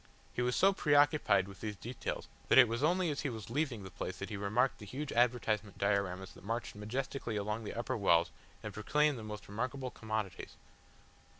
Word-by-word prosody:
He - - -1
was 125 0 +1
so 195 +1 +5
preoccupied 145 - +4
with 100 -1 -12
these 105 -1 -3
details 120 +5 -5 0.2
that - - +5
it 130 -2 +10
was 115 +2 -2
only 175 +2 +2
as 145 - -3
he 140 - -1
was 110 -3 -7
leaving 130 -6 -1
the 95 - -9
place 95 - -5
that 95 - -5
he - - -2
remarked 105 +6 +1
the 105 - -9
huge 140 +6 -4
advertisement 115 -4 +1
dioramas 95 -2 0
that - - -15
marched 115 +4 -3
majestically 115 +3 -3
along 105 +2 -2
the - - -5
upper 120 +2 -2
walls 85 -5 +3 0.3
and 105 -2 -5
proclaimed 145 +6 +2
the - - -7
most 105 -1 -7
remarkable 125 +5 -3
commodities. 110 -5 -4
115 Hz, 195 wpm, -34 LUFS, 100-130 Hz, 0.3 s, it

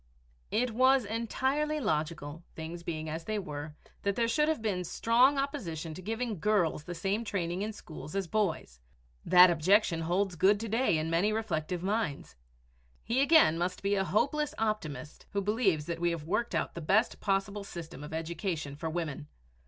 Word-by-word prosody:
It 245 +2 +1
was 260 +1 +4
entirely 265 +8 -1
logical, 155 - -2
things 165 +2 -6
beings 160 -2 -4
as 165 +1 -5
they 215 +3 -2
were, 150 -5 -6 0.3
that 200 -1 0
there 230 -1 +1
should 300 +6 +2
have 315 -4 +1
been 200 -5 -1
strong 245 - +3
opposition 180 - -3
to 185 - -8
giving 225 0 -3
girls 175 -6 +1
the 175 - -6
same 195 +6 -1
training 180 -4 -2
in 215 +2 -2
schools 160 -6 -9
as 195 -1 0
boys. 170 - -1 0.4
That 180 0 +8
objection 175 +1 +3
holds 180 +3 0
good 195 +5 +4
to 225 - -3
day 225 -5 +2
in 155 +1 -2
many 180 +6 +2
reflective 180 -6 -2
minds. 205 -6 -2 0.7
He 240 +4 +1
again 280 - +5
must 180 +2 -2
be 200 +1 +1
a 195 -1 +2
hopeless 280 +10 0
optimist 155 - -3
who 200 - +1
believes 200 -7 +1
that 170 0 -4
we 175 0 +2
have 170 -3 -3
worked 210 +9 -1
out - - -1
the 170 - -6
best 200 +9 +2
possible 200 +1 -1
system 165 -6 -8
of 150 - -8
education 160 -2 -3
for 160 +2 -4
women. 155 -3 -4
190 Hz, 175 wpm, -30 LUFS, 165-220 Hz, 0.7 s, That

